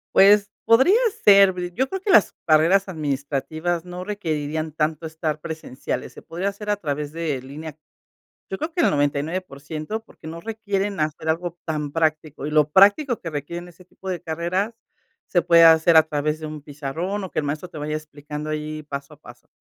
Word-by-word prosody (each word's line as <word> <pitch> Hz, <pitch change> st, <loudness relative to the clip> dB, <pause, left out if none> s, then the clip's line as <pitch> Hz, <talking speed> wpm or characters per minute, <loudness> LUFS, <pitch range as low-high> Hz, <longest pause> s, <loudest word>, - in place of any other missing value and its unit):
Pues 200 Hz, +1 st, +6 dB, 0.2 s
podría 265 Hz, -, +6 dB, 0.3 s
ser, 195 Hz, -2 st, +7 dB, 0.2 s
yo 260 Hz, +5 st, 0 dB
creo 385 Hz, -1 st, -4 dB
que 395 Hz, -, 0 dB
las 200 Hz, -, +6 dB
carreras 165 Hz, +6 st, +4 dB
administrativas 155 Hz, +3 st, -2 dB
no 180 Hz, 0 st, -6 dB
requerirían 155 Hz, -6 st, -3 dB
tanto 155 Hz, +1 st, -1 dB
estar 160 Hz, -1 st, -3 dB
presenciales. 155 Hz, -5 st, -5 dB
Se -, -, -12 dB
podría 180 Hz, +4 st, -3 dB
hacer 210 Hz, +1 st, -8 dB
a 205 Hz, -, +3 dB
través 150 Hz, -4 st, -3 dB
de 155 Hz, -5 st, -3 dB
línea, 150 Hz, +3 st, -9 dB, 0.7 s
yo 190 Hz, -, -2 dB
creo 320 Hz, +1 st, -3 dB
que 345 Hz, -, -1 dB
el -, -, +4 dB
99% 155 Hz, +5 st, -2 dB
porque 160 Hz, -, -16 dB
no 165 Hz, +1 st, -7 dB
requieren 205 Hz, -3 st, -2 dB
hacer 155 Hz, +1 st, -2 dB
algo 175 Hz, +1 st, -1 dB
tan 150 Hz, -3 st, -3 dB
práctico 155 Hz, -3 st, -1 dB
y -, -, -3 dB
lo 150 Hz, -1 st, +3 dB
práctico 205 Hz, -, +5 dB
que 165 Hz, -, -5 dB
requieren 170 Hz, +4 st, -5 dB
ese 180 Hz, +1 st, -17 dB
tipo 190 Hz, +1 st, -11 dB
de 180 Hz, -2 st, -3 dB
carreras 175 Hz, +7 st, -2 dB, 0.5 s
se 175 Hz, -3 st, +2 dB
puede 170 Hz, -1 st, +6 dB
hacer 160 Hz, 0 st, +6 dB
a 155 Hz, -, +6 dB
través 150 Hz, 0 st, -2 dB
de 155 Hz, -, -5 dB
un 150 Hz, -1 st, -7 dB
pizarrón 155 Hz, +8 st, -4 dB
o 185 Hz, -, -7 dB
que -, -, -4 dB
el 150 Hz, -, +1 dB
maestro 150 Hz, +5 st, -3 dB
te -, -, -12 dB
vaya 150 Hz, +1 st, -3 dB
explicando 150 Hz, 0 st, -7 dB
ahí 155 Hz, 0 st, -4 dB
paso 140 Hz, +1 st, -7 dB
a 150 Hz, -, -25 dB
paso. 120 Hz, -2 st, -15 dB
160 Hz, 185 wpm, -23 LUFS, 150-190 Hz, 0.7 s, ser